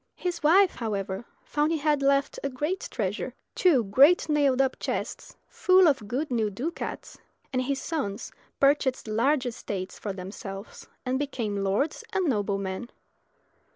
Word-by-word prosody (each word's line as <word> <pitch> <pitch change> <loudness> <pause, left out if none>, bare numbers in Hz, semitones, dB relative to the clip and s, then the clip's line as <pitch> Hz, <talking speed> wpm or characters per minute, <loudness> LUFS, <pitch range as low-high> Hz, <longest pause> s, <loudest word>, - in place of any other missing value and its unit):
His 355 -2 -3
wife, 365 +5 +6
however, 200 -2 -3 0.2
found 295 +2 +1
he 330 - +1
had 295 -1 +1
left 275 0 +2
a 275 - 0
great 300 +8 -2
treasure - - -3 0.2
two 305 -10 +4
great 275 - +5
nailed 285 -4 +3
up 270 -1 +1
chests - - -4
full 370 -1 +5
of 270 -8 +1
good 265 +6 -2
new 225 -3 +1
ducats; 265 - -5 0.3
and 255 - +1
his 270 +1 -1
sons 270 - -3 0.3
purchased 275 -3 +2
large 255 +6 +2
estates 195 -6 -5
for 205 - -3
themselves, 195 +2 -8 0.2
and 255 +1 0
became 240 -7 -2
lords 200 +10 0
and 380 - +1
noblemen. 200 - -1
260 Hz, 145 wpm, -27 LUFS, 210-300 Hz, 0.3 s, wife